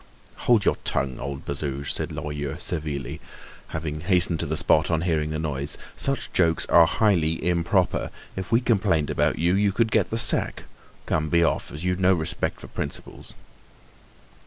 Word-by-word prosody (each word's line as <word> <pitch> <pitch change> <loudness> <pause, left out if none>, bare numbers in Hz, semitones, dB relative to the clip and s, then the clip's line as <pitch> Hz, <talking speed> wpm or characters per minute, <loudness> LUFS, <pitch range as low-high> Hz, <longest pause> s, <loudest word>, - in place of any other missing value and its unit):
"Hold 115 -4 +4
your - - +2
tongue, 65 -2 -1
old 70 0 -6
Bazouge!" 70 -1 -3
said - - -2
Lorilleux 75 -1 -4
severely, 75 -5 -4 0.5
having 75 -1 -4
hastened 90 -2 +3
to - - -1
the - - -1
spot - - +3
on 85 -1 +1
hearing 80 -3 0
the 80 - -2
noise, 75 -2 -3 0.2
"such 135 0 -2
jokes 85 -3 +2
are 85 -1 +7
highly 85 -8 +2
improper. 90 +1 +1 0.3
If 95 +1 -5
we 115 +2 +4
complained 100 - +1
about - - +1
you, 85 +2 +2
you 100 0 +2
would 115 -1 +2
get - - +2
the 115 - -2
sack. 120 - +3 0.4
Come, 75 0 0
be 85 +1 +3
off, 80 - 0
as 75 +3 -7
you've 90 0 0
no 95 0 +4
respect 80 -2 -3
for - - -9
principles." - - -6
85 Hz, 170 wpm, -25 LUFS, 75-95 Hz, 0.5 s, are